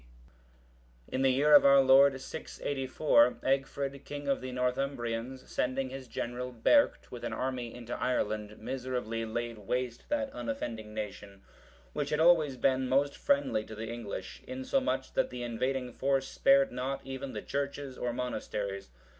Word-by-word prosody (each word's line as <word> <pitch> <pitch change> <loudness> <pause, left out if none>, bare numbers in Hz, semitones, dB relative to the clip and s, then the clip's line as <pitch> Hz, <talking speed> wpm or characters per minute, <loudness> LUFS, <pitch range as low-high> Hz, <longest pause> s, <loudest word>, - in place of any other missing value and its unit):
D.] - - -11
In 130 - 0
the 135 - +5
year 145 +4 +4
of 145 - +10
our 140 0 +7
Lord 135 0 +6
684, 145 - +1
Egfrid, 135 0 -1
king 145 0 -6
of 140 - +1
the 130 0 -5
Northumbrians, 125 -1 -2
sending 130 +1 -1
his 135 -1 -7
general, 125 +2 -4
Berct,(720) 125 - +3
with 120 -1 -8
an 120 -1 -3
army 125 -1 -3
into 120 -1 -6
Ireland, 105 -4 -1
miserably 125 -2 -3
laid 115 0 -4
waste 125 +3 -3
that 285 -2 0
unoffending 115 - -5
nation, 100 -2 -6 0.5
which 145 -1 -2
had 150 0 0
always 160 -5 +5
been 130 0 +2
most 140 +2 +2
friendly 140 -6 +1
to 110 - -9
the 110 +1 -5
English; 105 -5 -6
insomuch 260 - -1
that - - +1
the 125 -1 -5
invading 125 +2 -2
force 135 0 +1
spared 275 - +4
not 135 - -3
even 135 0 -5
the 105 - -5
churches 140 -1 -3
or 125 - -2
monasteries. 105 - -4
130 Hz, 155 wpm, -31 LUFS, 120-140 Hz, 0.5 s, of